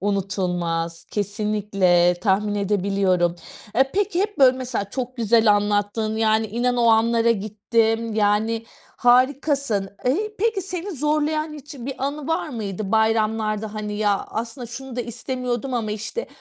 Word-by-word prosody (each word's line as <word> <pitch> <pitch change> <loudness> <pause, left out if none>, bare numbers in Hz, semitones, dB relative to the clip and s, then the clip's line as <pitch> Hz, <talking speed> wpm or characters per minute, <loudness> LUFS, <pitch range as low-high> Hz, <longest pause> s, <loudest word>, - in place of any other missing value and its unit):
Unutulmaz, 180 -4 -2
kesinlikle, 200 -4 +1
tahmin 205 0 +1
edebiliyorum. 195 -3 +1 0.4
Eee, 265 +1 +4
peki 390 -2 +1
hep 415 0 -2
böyle 260 -2 +6
mesela, 245 -6 -3
çok 255 +1 -4
güzel 225 -2 +4
anlattın. 205 +1 0
Yani, 220 0 +2
inan 245 +3 0
o 235 - +3
anlara 230 +1 +4
gittim. 225 +1 0
Yani, 220 +2 +1 0.3
harikasın. 255 -3 +2 0.2
Eee, 415 +12 +1
peki, 440 -2 +1
seni 365 +1 -5
zorlayan 305 +1 0
hiç 290 0 -10
bir 265 +1 -5
anı 290 0 -5
var 325 -1 0
mıydı, 210 -5 -4
bayramlarda? 220 -1 +1
Hani, 210 -1 -4
ya 205 -2 +1
aslında 235 +3 -5
şunu 250 +2 -8
da - - 0
istemiyordum 245 +2 -3
ama 225 -3 -1
işte 215 - -4
225 Hz, 135 wpm, -23 LUFS, 205-260 Hz, 0.4 s, böyle